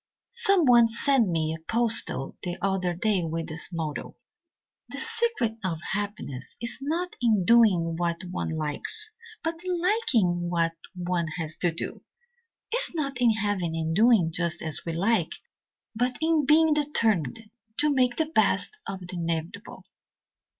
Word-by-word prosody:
"Someone 350 - +5
sent 235 -1 +2
me 160 -2 0
a 160 - -8
postal 225 - +2
the 175 -1 -4
other 190 -2 -1
day 200 +1 +1
with 165 0 -3
this 160 +2 -4
motto: 160 -3 -5 0.7
'The - - -6
secret 445 - -1
of 170 -4 -2
happiness 195 -10 -4
is 235 +1 -2
not 335 +6 -2
in 215 -6 +2
doing 185 -8 +4
what 170 0 -2
one - - -3
likes, 435 - -4 0.3
but 325 0 -3
in 365 -1 -2
liking 230 - +1
what 165 -1 0 0.2
one 175 -2 -2
has 160 -2 -4
to 175 -1 +1
do.' 165 - -5 0.7
It 475 - +1
is - - +5
not 275 -5 -2
in 240 - +5
having 205 -6 -1
and 160 0 -2
doing 215 -6 +4
just 170 -1 -2
as 160 -2 -5
we 165 - -2
like, 190 0 +1 0.6
but 245 +2 -1
in 315 -3 +1
being 315 +1 +5
determined 225 - 0 0.3
to 295 0 +2
make 250 -2 +2
the 320 - +1
best 330 +6 +2
of 190 - -5
the 180 0 -7
inevitable. 170 +5 -4
205 Hz, 150 wpm, -26 LUFS, 170-275 Hz, 0.7 s, Someone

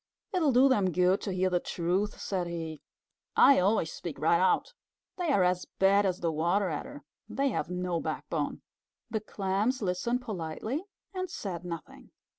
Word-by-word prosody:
"It'll 325 -6 +3
do 255 +2 +6
them 205 -8 +3
good 180 +2 +3
to 200 - -3
hear 185 0 +1
the 175 - +3
truth," 185 +5 -1
said 185 -3 -2
he. 165 -3 -5 0.5
"I 275 - +7
always 185 -3 +2
speak 170 -4 -6
right 170 +2 +3
out. 190 - +2 0.4
They 350 -4 0
are 200 -9 +4
as 180 0 +1
bad 195 +1 +4
as 185 -1 -2
the 170 -1 +1
Water 175 +5 +1
Adder. 145 -2 -6 0.3
They 275 +1 +1
have 230 - -2
no 180 -1 -1
backbone." - - -3 0.5
The 220 -1 -1
Clams 210 +5 -1
listened 220 +6 -1
politely 215 - -3 0.3
and 370 -1 -3
said 180 -4 -5
nothing. 170 -2 -8
185 Hz, 165 wpm, -29 LUFS, 175-220 Hz, 0.5 s, I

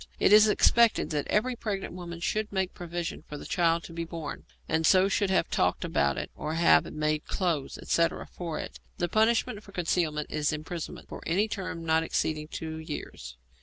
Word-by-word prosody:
It - - +5
is 215 0 +8
expected 230 0 +4
that 150 -2 -1
every 245 +4 +1
pregnant 200 -6 -4
woman 170 -2 -7
should 215 +4 -1
make 190 -2 -1
provision 175 -2 -5
for 150 - -6
the - - -9
child 170 -2 +2
about - - -24
to 165 - -10
be 170 0 -3
born, 165 -2 -6 0.2
and 160 +1 +1
so 185 +3 +5
should 200 0 +1
have 185 -3 +2
talked 90 - +1
about 70 -1 +1
it - - -4
or 155 +1 -4
have 120 - +4
made 155 0 -1
clothes, 170 -7 -1
etc., 165 0 0
for 170 -3 -5
it. - - -7 0.2
The 175 - 0
punishment 220 +1 +2
for 200 - -15
concealment 160 -4 -1
is 150 0 0
imprisonment 160 +2 -6
for - - -8
any 195 +6 +2
term 185 -6 -5
not 160 0 +3
exceeding 155 -1 -1
two 160 0 -5
years. 145 - -7
170 Hz, 195 wpm, -28 LUFS, 155-190 Hz, 0.2 s, is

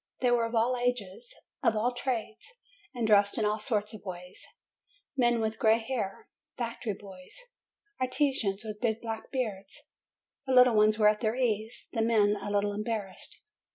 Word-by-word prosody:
They 250 -1 +3
were 235 -1 +3
of 230 - -5
all 235 +3 +3
ages, 240 -3 -2 0.3
of 225 - +3
all 235 +4 +1
trades, 245 - -4 0.4
and 240 -2 -1
dressed 205 -2 +5
in 220 - +2
all 210 +1 0
sorts 215 0 -1
of 215 - -10
ways, 180 -1 -8 0.7
men 240 -3 +3
with 220 0 -2
gray 220 0 +5
hair, 225 -4 -4 0.3
factory 230 -3 -3
boys, 190 - -12 0.6
artisans 255 -6 0
with 215 -1 -7
big 225 -2 0
black 225 -1 -6
beards. 210 -7 -4 0.7
The 265 - +1
little 250 -1 +7
ones 215 0 +4
were 215 -1 +5
at 210 0 0
their 220 0 0
ease; 225 -3 -1
the 225 - -1
men, 215 -2 +3
a 205 0 -5
little 205 0 +1
embarrassed. 210 -2 -4
220 Hz, 165 wpm, -29 LUFS, 205-240 Hz, 0.7 s, little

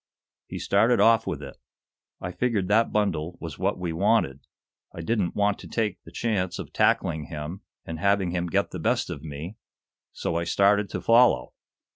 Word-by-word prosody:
He - - -6
started 115 +5 +3
off 115 -1 +5
with 80 -6 -3
it. 70 - -9 0.6
I 90 - -5
figured 105 -3 0
that 110 +3 +3
bundle 90 -5 -1
was 80 -4 -7
what 95 +2 0
we 90 -2 -3
wanted. 85 - +2 0.6
I 85 - -5
didn't 100 -1 -1
want 100 0 +1
to - - -10
take 105 -5 -2
the - - -14
chance 100 -6 -1
of - - -8
tackling 80 -2 +1
him 80 +3 -6 0.2
and 80 -1 -6
having 100 -1 +2
him 90 0 -1
get 85 - 0
the - - -5
best - - 0
of 70 - -6
me, 80 +7 -7 0.5
so 85 - -2
I 85 - 0
started 100 +3 +3
to - - -4
follow. 120 +1 +4
95 Hz, 180 wpm, -26 LUFS, 85-105 Hz, 0.6 s, off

